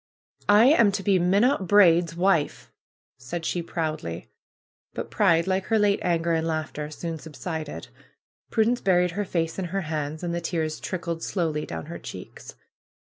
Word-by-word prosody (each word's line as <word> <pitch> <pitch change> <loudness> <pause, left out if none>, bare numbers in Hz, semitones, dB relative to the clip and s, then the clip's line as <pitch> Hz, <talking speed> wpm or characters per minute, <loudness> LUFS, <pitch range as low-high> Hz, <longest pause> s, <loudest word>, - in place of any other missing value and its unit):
"I 210 +3 +7
am 235 -7 +5
to 195 - -2
be 195 -2 +3
Minot 195 +4 +2
Braid's 170 -4 +5
wife!" 165 - 0 0.5
said 165 +7 -5
she 175 - -1
proudly. 155 - -4 0.6
But - - -5
Pride, 165 0 +3
like 190 0 0
her 225 - +2
late 205 -1 +3
anger 170 -1 +1
and 160 0 0
laughter, 155 -2 -3
soon 165 +1 -5
subsided. 160 0 -6 0.6
Prudence 230 +2 +1
buried 180 -2 +3
her 205 +4 -2
face 165 -1 -2
in 190 - -2
her 195 +3 -2
hands, 155 -1 -4
and 170 -1 -2
the 170 - -2
tears 160 -2 -2
trickled 170 -3 -4
slowly 160 -6 -2
down 80 -1 -6
her - - -7
cheeks. - - -10
170 Hz, 160 wpm, -25 LUFS, 160-195 Hz, 0.6 s, I